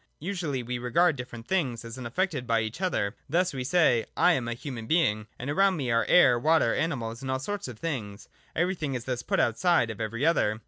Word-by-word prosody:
Usually 160 -7 -3
we 125 +1 -4
regard 155 +7 +2
different 125 -2 -8
things 135 -12 -1
as 115 0 -7
unaffected 130 +2 -2
by 115 -1 +2
each 110 - -5
other. 115 - -1
Thus 175 +3 +1
we 130 -2 -3
say: 130 -6 +3
I 180 - +5
am 125 -6 -1
a 120 - -2
human 125 -4 -7
being, 110 -10 +1
and 125 - -6
around 190 +5 +2
me 130 -5 -2
are 115 0 +2
air, 130 -9 +6
water, 160 +5 +3
animals, 120 -7 -2
and 135 - -5
all 130 - +1
sorts 205 +8 -4
of 125 -4 -8
things. 110 -11 -5 0.3
Everything 165 -5 -1
is 120 -1 -5
thus 125 -2 -2
put - - -1
outside 120 - +2
of 110 - -8
every 115 +5 -2
other. 110 -10 +2
130 Hz, 215 wpm, -27 LUFS, 115-165 Hz, 0.3 s, air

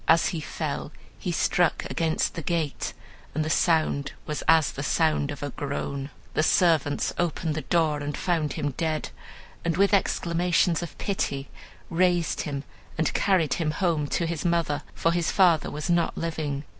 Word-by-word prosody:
As 165 - +5
he 170 - -3
fell - - -4 0.3
he - - -2
struck - - +2
against 160 -1 0
the 165 - -4
gate, 160 -3 -2 0.4
and 155 0 0
the 155 - -1
sound 155 -5 +2
was 150 - -3
as 160 -2 +5
the 135 - -6
sound 155 -1 +1
of 145 -1 -5
a 145 - -3
groan. 140 0 -4 0.2
The - - +2
servants 160 -3 +2
opened 170 -2 0
the 155 - -2
door 160 -3 +1
and 145 0 -4
found 160 -5 0
him 145 -3 -2
dead, 155 +2 -2 0.5
and 170 -1 0
with 200 +1 +4
exclamations 175 -3 +2
of 170 -3 -7
pity 140 -8 -2 0.4
raised 175 -1 +2
him 140 -2 -4 0.3
and 160 -1 +1
carried 185 -6 +2
him 165 -3 0
home 155 -2 0
to 170 - 0
his 165 -1 -3
mother, 170 -4 +1
for 165 - +2
his 170 -1 0
father 175 -6 +4
was 150 0 -4
not 170 -1 +1
living. 155 -4 -2
160 Hz, 170 wpm, -26 LUFS, 145-170 Hz, 0.5 s, As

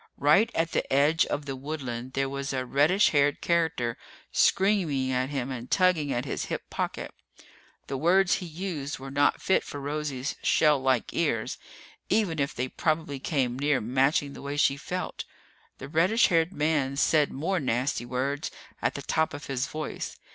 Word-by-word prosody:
Right 155 +10 +4
at 165 0 0
the - - -2
edge 145 +4 +3
of 145 - -3
the 135 -1 -4
woodland, 130 -3 -5
there 135 0 0
was 140 0 -4
a 130 -1 -2
reddish 150 +10 +3
haired 145 -1 +2
character 160 -9 0 0.3
screaming 170 -10 +2
at 130 +1 0
him 135 -2 -3
and 125 -1 -6
tugging 180 -6 +2
at 120 +1 -1
his - - -3
hip - - -5
pocket. - - -3 0.7
The 135 - -4
words 175 +5 +4
he 180 - -2
used 160 -4 -4
were 135 0 -8
not 145 +1 +2
fit 190 - +3
for 145 - -7
Rosie's 145 -2 -3
shell 150 -2 +4
like 130 -2 +1
ears 130 -10 -1 0.5
even 195 -7 +1
if 140 0 -1
they 125 +1 -1
probably 155 0 -1
came 130 -4 -1
near 145 -1 +2
matching 135 +5 +1
the - - -10
way 140 +1 -4
she 140 -1 +3
felt. 180 +5 -4 0.5
The 135 - -8
reddish 180 - +3
haired 165 -1 +2
man 150 -5 0
said 150 0 +3
more 175 +7 -1
nasty 130 -2 -1
words 140 +4 -2 0.3
at - - 0
the - - -5
top 160 -1 0
of 145 - -8
his 130 -1 -2
voice. 155 0 -5
145 Hz, 175 wpm, -27 LUFS, 135-160 Hz, 0.7 s, Right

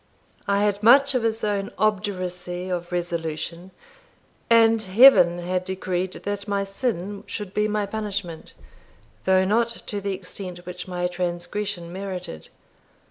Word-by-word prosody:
I 200 0 +2
had 205 -1 +1
much 275 +5 +6
of 255 - +1
his 225 0 -1
own 205 -1 -1
obduracy 185 -3 -2
of 175 0 -3
resolution, 170 0 -3 0.8
and 225 -1 +5
Heaven 195 -4 +7
had 180 +1 -2
decreed 185 -1 -2
that 205 0 -5
my 200 -1 0
sin 195 -1 -3
should 205 -3 -6
be 210 0 +1
my 210 -1 0
punishment, 200 -5 -5 0.7
though 190 0 +4
not 225 +4 +3
to 210 -3 -4
the 200 0 -2
extent 180 -2 -7
which 180 +1 -7
my 180 -1 -2
transgression 175 +1 -3
merited. 185 - -6
190 Hz, 135 wpm, -24 LUFS, 180-210 Hz, 0.8 s, Heaven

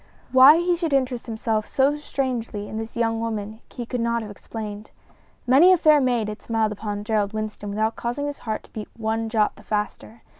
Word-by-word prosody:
Why 265 +4 +9
he 345 +1 +2
should 330 -4 -2
interest 255 -3 0
himself 220 -1 -1
so 275 +2 +2
strangely 250 -8 -3
in 220 - -6
this 225 +1 -6
young 225 -1 +1
woman 220 -1 -4
he 240 - -6
could 245 0 -3
not 235 0 0
have 210 - -8
explained. 210 0 -7 0.6
Many 275 +9 +6
a 370 - +6
fair 305 -3 +5
maid 245 -4 +1
had 215 0 -6
smiled 225 -2 0
upon 205 0 -4
Gerald 210 -1 0
Winston 215 -1 -4
without 220 +2 -1
causing 245 +5 -3
his 290 -1 -5
heart 220 -2 -4
to - - -20
beat 215 -1 -6
one 225 0 -1
jot 215 -2 +1
the - - -14
faster. 215 +2 -4
225 Hz, 200 wpm, -24 LUFS, 215-255 Hz, 0.6 s, Why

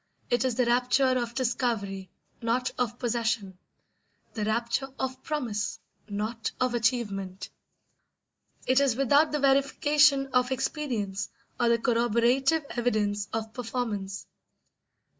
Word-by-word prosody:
It 240 0 +3
is 255 -3 0
the 250 0 +2
rapture 250 +2 +3
of 235 -1 -4
discovery, 230 -7 -1 0.3
not 235 +2 0
of 240 -1 -1
possession; 230 -6 -1 0.7
the 215 - -3
rapture 235 +4 0
of 260 0 -3
promise, 230 -9 -3 0.3
not 215 +3 -3
of 255 -1 +1
achievement. 205 -5 -1 1.1
It 255 +1 +4
is 275 -5 +2
without 285 +4 +4
the 300 - +1
verification 280 +1 +4
of 250 0 +2
experience 230 -8 -2 0.3
or 240 - +3
the 235 - +4
corroborative 240 +6 +2
evidence 210 - 0
of 220 0 -4
performance. 225 -5 -4
240 Hz, 115 wpm, -28 LUFS, 220-260 Hz, 1.1 s, It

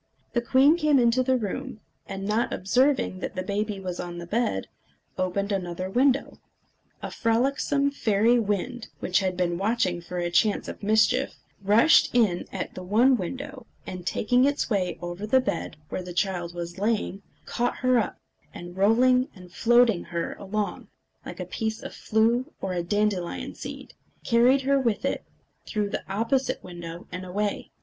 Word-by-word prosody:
The 240 - +1
queen 270 +6 +5
came 305 -4 +3
into 240 0 +4
the 260 0 +2
room, 245 +2 -4 0.3
and 195 0 -5
not 215 +3 0
observing 250 +1 +1
that - - -5
the 185 - -2
baby 205 +1 -2
was 180 -2 -5
on 175 -1 -5
the 175 - -6
bed, 190 - -1 0.5
opened 190 +2 -1
another 185 -1 -3
window. 265 +4 +2 0.6
A - - -4
frolicsome 275 +4 +1
fairy 230 -1 +3
wind, 220 +3 -2
which 185 - +1
had 185 -2 -1
been 175 -1 0
watching 195 -4 0
for 180 +1 -7
a 175 -1 -1
chance 205 +4 +2
of - - -7
mischief, 220 +5 +2 0.3
rushed 220 +11 +5
in 205 -8 +2
at - - -4
the 185 - -7
one 225 +8 +4
window, 260 +5 -6 0.2
and 180 -1 -6
taking 245 +7 +2
its 285 -3 0
way 190 -4 0
over 175 +4 -5
the 260 +4 +5
bed 255 - -3
where - - -3
the 180 -1 -8
child 175 -2 -1
was 175 +1 -6
lying, 205 -2 -1 0.2
caught 245 +1 -1
her 255 -1 +5
up, 220 - -3 0.4
and 175 0 -9
rolling 250 +6 +4
and 180 -2 -13
floating 240 -4 +4
her 170 -1 -3
along 205 +1 -3 0.4
like - - -8
a - - -3
piece 220 -1 -3
of - - -7
flue, 235 +6 +1
or 190 - -3
a 175 - -1
dandelion 195 -1 -1
seed, - - -8 0.3
carried 250 +3 +4
her 275 +1 +3
with 235 -5 0
it - - -1 0.4
through 210 -2 -1
the - - -2
opposite 230 +6 0
window, 175 -1 -8
and 180 +1 -5
away. 200 +3 -2
210 Hz, 170 wpm, -26 LUFS, 185-245 Hz, 0.6 s, queen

